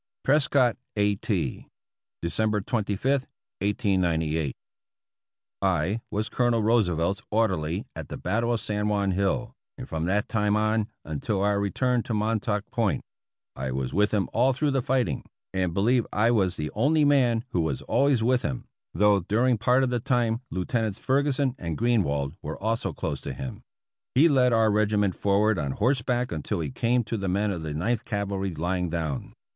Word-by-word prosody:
Prescott, 135 -3 +3 0.2
a. 105 -1 +2
T., 85 - -2 0.6
December 105 +5 0
25, 120 +6 -1 0.3
1898. 85 - 0 1.1
I 95 +10 +1
was 105 +2 -2
Colonel 120 -2 +1
Roosevelt's 95 -5 +2
orderly 95 -3 0
at 80 -3 -7
the - - -5
battle 115 +6 0
of 115 - +1
San 105 -1 -2
Juan 100 -2 +1
Hill, 100 +6 0 0.2
and 130 -1 -7
from 80 0 -3
that 100 +4 +1
time 105 -3 +1
on 110 0 +1 0.2
until 85 +6 -2
our 100 0 +2
return 125 +5 +1
to 115 - -3
Mon 110 +1 +1
tauk 105 -2 -1
Point. 110 - 0 0.5
I 65 -1 -3
was 65 0 -3
with 105 +1 +2
him 105 -3 +1
all 130 +4 +3
through 145 +3 0
the 135 -1 +1
fighting, 120 - 0 0.3
and 95 -2 0
believe 115 +7 +2
I 115 +3 +3
was 95 -6 +2
the 75 -2 -4
only 145 +7 +3
man 125 -5 +3
who 90 - 0
was 80 -5 -2
always 135 -5 +2
with 125 +1 +3
him, 65 - -3 0.3
though 105 +2 +4
during 115 +6 +1
part 125 +2 +3
of 130 - 0
the 120 - +1
time 120 -1 0
Lieutenants 110 +2 -1
Ferguson 135 0 +1
and 85 -3 -4
Greenwald 80 - +1
were - - -5
also 115 +3 -1
close - - -4
to - - -5
him. 65 - -7 0.5
He 145 +6 +7
led 130 -5 +4
our 110 -2 +4
regiment 105 -2 +2
forward 100 +1 +2
on 70 -2 -2
horseback 125 - 0
until 85 +5 -3
he 75 -4 -3
came 120 - +1
to 115 +1 -3
the 100 -2 -2
men 100 +3 +1
of 90 -4 -4
the 75 -2 -4
Ninth 110 +8 0
Cavalry 100 -4 -2
lying 90 +2 -1
down. 80 -5 -3
105 Hz, 170 wpm, -26 LUFS, 90-120 Hz, 1.1 s, He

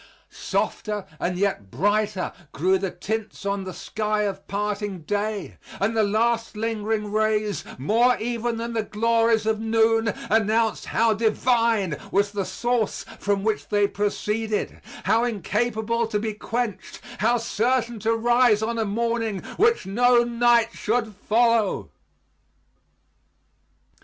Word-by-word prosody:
Softer 210 -2 -2
and 180 0 -1
yet 190 - -1
brighter 205 - 0 0.2
grew 185 +4 +2
the 195 0 -2
tints 220 +2 -5
on 200 -1 -1
the 185 - -5
sky 215 -1 -1
of 195 -1 -4
parting 205 -2 -3
day; 205 +4 -3 0.2
and 215 +4 0
the 220 - +3
last 225 +2 +1
lingering 215 -1 -2
rays, 215 -1 0
more 230 - +3
even 235 0 -2
than 235 +1 -4
the 225 - +1
glories 225 +1 +2
of 220 -1 +1
noon, 225 0 +2 0.2
announced 220 +1 +2
how 225 0 +3
divine 225 - +1
was 200 +1 +2
the 200 -2 -2
source 240 -1 -1
from 200 -1 0
which 215 0 -1
they 205 -1 +3
proceeded; 210 +1 -2 0.2
how 225 +2 +3
incapable 230 +1 -1
to 215 - -1
be 215 +1 -2
quenched; 230 0 -4 0.2
how 235 +3 +3
certain 235 +1 0
to 225 +3 +1
rise 240 -1 +3
on 230 +1 -1
a 220 - +1
morning 225 -2 -1
which 455 +3 +3
no 240 +4 +4
night 235 -1 +3
should 220 0 -1
follow. 225 +1 +1
220 Hz, 130 wpm, -24 LUFS, 205-230 Hz, 0.2 s, no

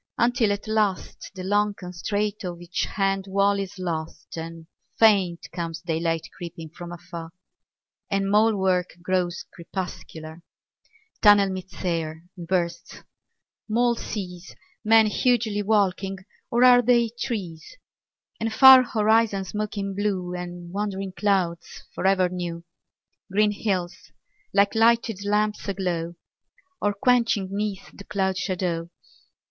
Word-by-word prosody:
Until 235 -3 +2
at 205 +1 -3
last 215 -3 -1
the 185 - -6
long 205 +2 +1
constraint 205 +3 -3
Of 175 -2 -5
each 175 0 -2
hand 195 -1 -1
wall 200 +1 +2
is 195 0 -5
lost, 165 -3 -5
and 165 0 -7 0.3
faint 195 -6 +4
Comes 170 -1 -4
daylight 165 -1 -1
creeping 170 -2 -8
from 175 +2 -9
afar; 170 -1 -8 0.8
And 195 0 0
mole 215 +1 +4
work 185 -2 0
grows 180 -1 -1
crepuscular. 170 -2 -7 0.8
Tunnel 205 -2 +6
meets 185 +1 -7
air 165 -2 -2
and 175 -3 -9
bursts; 170 -2 -2 0.7
mole 240 +2 +3
sees 185 -6 -6 0.3
Men 225 0 +6
hugely 220 -1 +1
walking... 195 -2 +1 0.3
or 240 +1 +2
are 250 -1 +8
they 240 -1 +3
trees? 195 - -5 0.6
And 225 0 -1
far 265 +3 +9
horizons 215 -4 +1
smoking 205 -2 -3
blue 190 -3 -2
And 175 -1 -7
wandering 195 -1 -3
clouds 185 -5 -1
for - - -1
ever 190 -1 +3
new; 175 -2 -5 0.7
Green 210 +2 +3
hills, 190 -4 -2 0.6
like 200 0 +3
lighted 225 -2 +2
lamps 210 +1 0
aglow 175 -3 -2 0.7
Or 205 - +2
quenching 230 -2 +2
'neath 200 -1 -4
the 200 - -10
cloud 190 -1 -1
shadow. 175 -3 -2
195 Hz, 125 wpm, -24 LUFS, 175-210 Hz, 0.8 s, far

